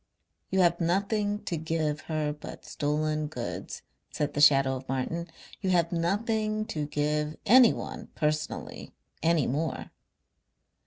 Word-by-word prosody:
"You 190 0 +2
have 175 0 +3
nothing 205 +4 0
to 170 - -2
give 155 -1 -1
her 155 -2 0
but 150 - -10
stolen 155 +1 -1
goods," 125 -5 -6 0.3
said 150 -1 -2
the 145 - 0
shadow 135 -2 +6
of 130 +1 -12
Martin. 150 +6 -2 0.3
"You 190 - -1
have 170 -2 +2
nothing 215 +5 0
to 150 -2 -2
give 150 +1 -1
anyone 245 +1 +4
personally 155 0 -3 0.3
any 165 -4 +3
more.... 155 +5 -2
155 Hz, 125 wpm, -28 LUFS, 150-185 Hz, 0.3 s, shadow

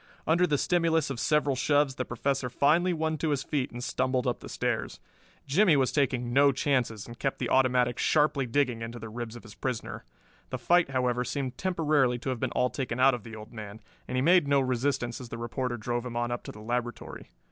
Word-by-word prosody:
Under 170 +3 +3
the 145 - +1
stimulus 165 -3 +1
of 125 - -4
several 145 -1 +2
shoves 145 +1 +2
the 130 -1 -3
Professor 130 +1 -1
finally 160 +8 +3
won 160 -2 -1
to 160 - 0
his 140 -3 0
feet 140 -3 -1
and 120 +1 -7
stumbled 130 0 0
up - - -1
the - - -10
stairs. - - -2 0.5
Jimmie 165 +4 +4
was 130 -2 +2
taking 125 -4 0
no 140 +1 +6
chances 125 -6 0
and 120 0 -11
kept 135 - -1
the 120 - -3
automatic 125 -2 +3
sharply 150 -3 +2
digging 125 -2 0
into 115 +1 -6
the 110 -1 -8
ribs 115 0 -6
of 120 - -10
his 110 - -12
prisoner. 125 -2 -4 0.5
The - - -3
fight, 175 -3 +3
however, 125 -2 0
seemed 130 -1 -3
temporarily 150 -8 +1
to 125 - -5
have 130 -2 -2
been - - -1
all 125 - +1
taken 130 -3 -3
out 135 +1 +6
of 120 -4 -4
the 115 -1 -9
old 110 +2 -11
man, 105 -1 -8 0.3
and 125 - -4
he 130 - +1
made 175 -1 +5
no 140 0 +4
resistance 130 -1 -1
as 125 - -9
the 115 - -6
reporter 120 +1 -3
drove 120 +2 -2
him 120 -2 -5
on 120 0 -1
up 120 - -3
to - - -6
the 105 - -12
laboratory. 120 +2 -4
130 Hz, 225 wpm, -28 LUFS, 120-145 Hz, 0.5 s, no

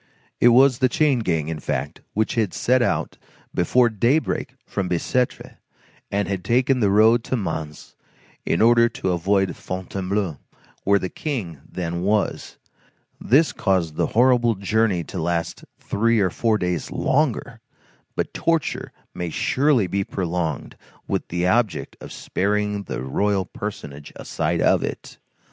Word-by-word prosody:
It - - +5
was 125 +1 +6
the 130 -2 +3
chain 140 -1 +2
gang, 80 -8 -1
in 80 -1 -4
fact, - - -3
which 110 +3 0
had 110 - 0
set 125 +12 +2
out - - -1 0.3
before 120 +8 +3
daybreak 120 +8 0
from 95 -2 -3
Bicêtre, 120 +8 -1 0.5
and 100 0 -1
had 95 -2 -3
taken 125 +5 +2
the 105 -4 +3
road 110 +4 +5
to 130 - -1
Mans 80 -7 -5 0.5
in 85 - +1
order 115 0 +5
to 95 - -2
avoid 95 +2 +1
Fontainebleau, 95 -2 -3 0.5
where 100 +1 +5
the 95 - -2
King 100 - -4
then 85 -1 -3
was. 105 +2 -1 0.6
This 150 +6 +3
caused 90 -6 0
the - - +1
horrible 120 -2 +4
journey 100 -2 +1
to 90 +1 -6
last 85 0 -2
three 115 +2 +1
or 95 -3 +2
four 110 +1 +1
days 90 -5 -2
longer; 135 -4 0 0.5
but - - -2
torture 165 -2 -1 0.2
may 90 -1 -4
surely 130 - +2
be 100 +2 -1
prolonged 90 -5 -3 0.3
with - - -2
the 90 +1 -1
object 110 +2 +1
of - - -9
sparing 105 +1 -1
the 65 - -4
royal 95 +8 0
personage 75 -9 -7
a - - -10
sight - - -1
of - - +3
it. - - -6
100 Hz, 145 wpm, -23 LUFS, 90-120 Hz, 0.6 s, was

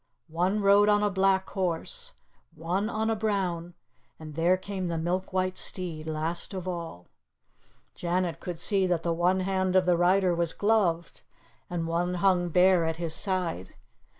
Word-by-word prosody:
One 185 +5 +1
rode 200 +1 +5
on 205 0 +3
a 205 - +1
black 190 0 +2
horse, 200 - -3 0.4
one 180 +7 -2
on 220 0 -1
a - - +1
brown, 185 -5 -2 0.4
and 155 -1 -10
there 170 +4 +2
came 190 -1 -4
the 170 -1 -2
milk 180 +4 -2
white 185 0 -1
steed 165 -4 -3
last 160 +4 -3
of 185 -1 -5
all. 170 - -6 0.9
Janet 175 -1 -2
could 175 -3 -6
see 195 +1 +2
that 175 -2 -1
one 175 +3 +1
hand 190 0 0
of 185 -1 +4
the 180 -1 +3
rider 180 +1 +3
was 170 -1 0
gloved, 200 -6 0 0.5
and 175 -2 -2
one 175 +2 -1
hung 180 -1 +2
bare 180 +1 +4
at 160 0 -2
his 165 -2 -2
side. 175 - -2
180 Hz, 160 wpm, -27 LUFS, 170-190 Hz, 0.9 s, rode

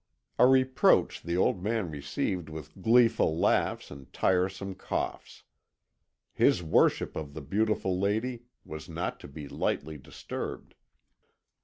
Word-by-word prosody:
A 125 - +8
reproach 130 -1 +3
the 85 +1 -2
old 90 0 +2
man 105 -4 -1
received 75 +4 -3
with 80 +3 -10
gleeful 115 -7 +4
laughs - - +1
and 70 -2 -11
tiresome 95 +1 0
coughs. 95 - -5 0.9
His 85 - +3
worship 80 - +2
of 75 -2 -6
the 80 - -5
beautiful 95 +3 0
lady 115 +5 -1 0.2
was 80 0 -8
not - - -4
to - - -10
be 70 +1 -9
lightly 80 +2 -2
disturbed. - - -7
90 Hz, 125 wpm, -29 LUFS, 80-110 Hz, 0.9 s, A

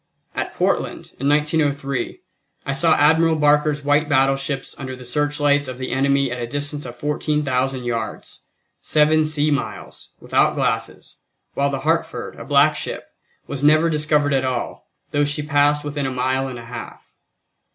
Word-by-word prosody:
At - - -4
Portland, - - -1
in 135 +2 +1
1903, 145 -3 0 0.4
I 135 - -1
saw 160 +3 +4
Admiral 160 +2 +4
Barker's 150 -1 +2
white 145 +2 +2
battleships 135 0 +1
under 130 -1 -5
the 125 0 -11
searchlights 145 +2 +1
of 130 -1 -6
the 130 0 -4
army 140 0 +2
at 125 0 -4
a 120 - -3
distance 145 +1 -3
of 120 - -9
14,000 135 -2 -1
yards, 115 -2 -5 0.4
seven 155 +1 +3
sea 155 0 +1
miles, 140 -1 -5
without - - +2
glasses, - - -2 0.3
while 140 0 +1
the 135 -1 -3
Hartford, 165 +2 -1
a - - -8
black - - +4
ship, - - -5 0.4
was 140 -1 -5
never 155 +3 +5
discovered 150 -1 +1
at 135 -1 +2
all, 130 -2 -4 0.2
though 145 - +2
she 145 +1 -1
passed 145 0 +2
within 145 -2 -3
a - - -3
mile 130 +1 0
and 130 -2 -6
a 115 - -9
half. 120 +1 -9
145 Hz, 160 wpm, -21 LUFS, 130-150 Hz, 0.4 s, never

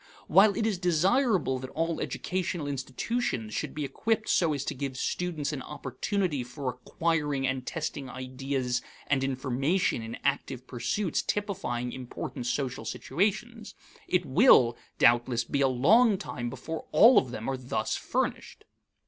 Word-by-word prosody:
While 195 +5 +5
it 220 - +1
is 210 -5 0
desirable 180 - +2
that 130 0 -7
all 165 0 -1
educational 180 -4 -2
institutions 135 - -2
should - - -3
be 150 -1 -2
equipped 220 +9 -1
so 170 -3 +3
as 140 -2 -3
to - - -2
give 135 -1 -4
students 155 -2 -2
an 135 - -4
opportunity 145 - -2
for 130 +2 -5
acquiring 145 +2 -1
and 130 -1 -2
testing 150 -4 -4
ideas 130 -1 -2 0.2
and 135 -2 +1
information 135 +4 0
in 115 +1 -6
active 135 -2 -1
pursuits 160 - -1
typifying 190 -13 -2
important 125 -1 -6
social 130 -1 -2
situations, 215 - -2 0.3
it 180 -1 +1
will, 130 - +6 0.2
doubtless, 120 0 +4
be 140 +4 -1
a 135 - +5
long 195 - +4
time 120 -10 -5
before 160 +6 -6
all 240 +3 +8
of 130 - -5
them 115 -1 -6
are 135 - 0
thus 130 -1 -2
furnished. - - -3
140 Hz, 145 wpm, -28 LUFS, 130-185 Hz, 0.3 s, all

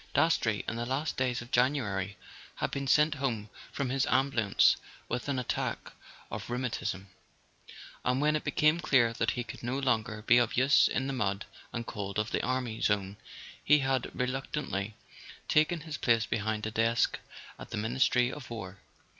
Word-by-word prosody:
Dastrey, 115 -10 +2
in 115 - -2
the 120 - -2
last 140 +4 -1
days 125 -2 -1
of 120 - -15
January, 105 -7 +1 0.4
had - - -2
been 140 0 -3
sent 150 +3 +4
home 120 -7 -3 0.2
from 140 -3 -2
his 135 +1 +1
ambulance 130 -6 +3 0.3
with 125 - -3
an 140 - 0
attack 125 - -3 0.4
of 110 +1 -5
rheu¬ 120 - -2
matism; 110 -6 -3 1.0
and 125 +1 +1
when 150 +1 +3
it 155 - -1
became 155 +2 +3
clear 120 -8 +3
that - - 0
he 120 - -1
could 115 - -9
no 120 +3 -2
longer 110 -5 0
be 120 +2 +6
of 120 -1 0
use 135 +3 +5
in 135 - -1
the 135 - -2
mud 100 -5 -1 0.3
and 115 -1 -4
cold 100 -2 -5
of 105 +1 -1
the - - 0
army 125 -3 -2
zone 100 -1 0 0.5
he 150 - +6
had 135 -2 0
reluctantly 125 -5 -2 0.5
taken 155 +2 +3
his 150 -2 -6
place 115 -2 +3
behind 110 -1 -2
a 110 - -3
desk 115 +1 +2 0.4
at - - -9
the - - -4
Ministry 125 +2 +2
of 145 -4 -9
War. 100 -4 -7
120 Hz, 175 wpm, -30 LUFS, 110-135 Hz, 1.0 s, be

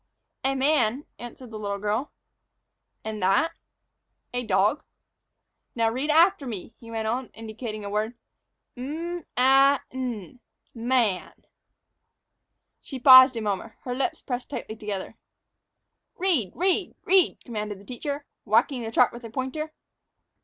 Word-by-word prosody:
"A 270 +1 +1
man," 270 -2 +2
answered 240 0 -10
the 215 - -6
little 200 -1 -3
girl. 210 +7 -2 0.9
"And 215 -1 -4
that?" 195 - +3 0.8
"A 245 0 -1
dog." 210 +6 +2 0.9
"Now 225 -1 +2
read 265 +6 -2
after 325 -1 +4
me," 220 -2 -6
he 230 - -13
went 225 -1 -3
on, 245 +3 -1
indicating 220 -1 -6
a - - -4
word, 215 +3 -1 0.6
"'M 320 +6 -5
a 270 +2 +5
n, 250 -5 -5 0.3
man.'" 235 -5 0 1.4
She 270 - -7
paused 260 0 +9
a - - -2
moment, 210 +1 -3
her 250 - -3
lips 315 +6 -2
pressed 245 -2 -4
tightly 220 -5 -5
together. 210 -3 -6 1.0
"Read, 325 - +1
read, 370 +1 +1
read!" 375 -2 +4
commanded 210 -4 -5
the 200 - -16
teacher, 280 +4 -5 0.2
whacking 265 -4 +2
the 225 - -4
chart 245 +1 +4
with 240 +1 -10
a 230 - -7
pointer. 265 +6 -4
245 Hz, 130 wpm, -26 LUFS, 215-275 Hz, 1.4 s, paused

